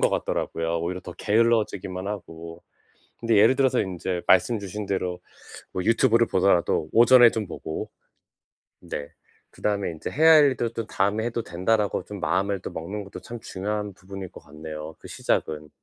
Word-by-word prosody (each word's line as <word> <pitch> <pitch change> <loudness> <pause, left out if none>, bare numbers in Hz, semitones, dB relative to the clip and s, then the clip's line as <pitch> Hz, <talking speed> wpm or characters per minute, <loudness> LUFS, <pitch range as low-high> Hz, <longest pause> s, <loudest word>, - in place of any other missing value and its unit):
것 - - +4
같더라고요, 85 0 -1
오히려 90 +2 -3
더 90 - -9
게을러지기만 105 -4 0
하고. 85 -4 -8 0.6
근데 115 -2 +1
예를 110 +6 +6
들어서 130 -2 +2
인제 90 -1 -3
말씀 105 +5 +4
주신 100 +1 -6
대로 90 -2 -2 0.5
뭐 90 - -3
유튜브를 115 +1 +3
보더라도 90 -4 +2
오전에 120 0 +7
좀 110 -4 -3
보고 80 -2 -6 0.9
네 70 -1 -6 0.4
그다음에 100 -3 -2
인제 80 -2 -6
'해야 160 +2 +5
할 150 -2 +8
일도 120 -4 0
또 115 -2 -5
다음에 105 +3 0
해도 120 -1 -2
된다.'라고 105 +4 0
좀 105 -1 -8
마음을 95 +4 0
또 - - -6
먹는 100 +6 -6
것도 100 - -10
참 120 - -8
중요한 105 0 -4
부분일 95 0 -9
것 - - -11
같네요, 75 +1 -9
그 - - -13
시작은. 75 -1 -2
100 Hz, 355 characters per minute, -25 LUFS, 90-115 Hz, 0.9 s, 할